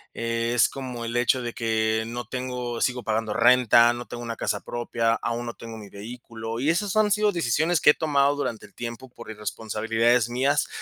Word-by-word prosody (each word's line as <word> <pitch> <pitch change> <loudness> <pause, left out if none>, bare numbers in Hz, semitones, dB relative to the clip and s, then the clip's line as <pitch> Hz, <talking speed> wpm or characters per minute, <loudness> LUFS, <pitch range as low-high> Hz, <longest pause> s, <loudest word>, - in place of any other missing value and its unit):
Es 115 0 +1
como 125 -3 -6
el 115 +1 -4
hecho 125 +1 +2
de 120 -1 -4
que 110 -1 0
no 120 +1 -5
tengo 125 -2 -4
sigo 125 -1 0
pagando 110 -1 -1
renta, 120 0 +5
no 120 0 -6
tengo 120 - -8
una 115 -1 -4
casa - - -2
propia, 115 -1 -1
aún 120 +1 -3
no 120 - -5
tengo 115 -1 -9
mi 105 -2 -10
vehículo, 115 +1 -7
y 140 - +1
esas 190 +5 0
han 215 -1 +4
sido 210 0 +3
decisiones 160 - +1
que - - +6
he - - 0
tomado 145 -2 +2
durante 115 -7 -4
el 100 - -27
tiempo 120 +2 -7
por 115 -2 -10
irresponsabilidades 115 +3 0
mías, 135 +4 +1
120 Hz, 195 wpm, -25 LUFS, 115-130 Hz, -, que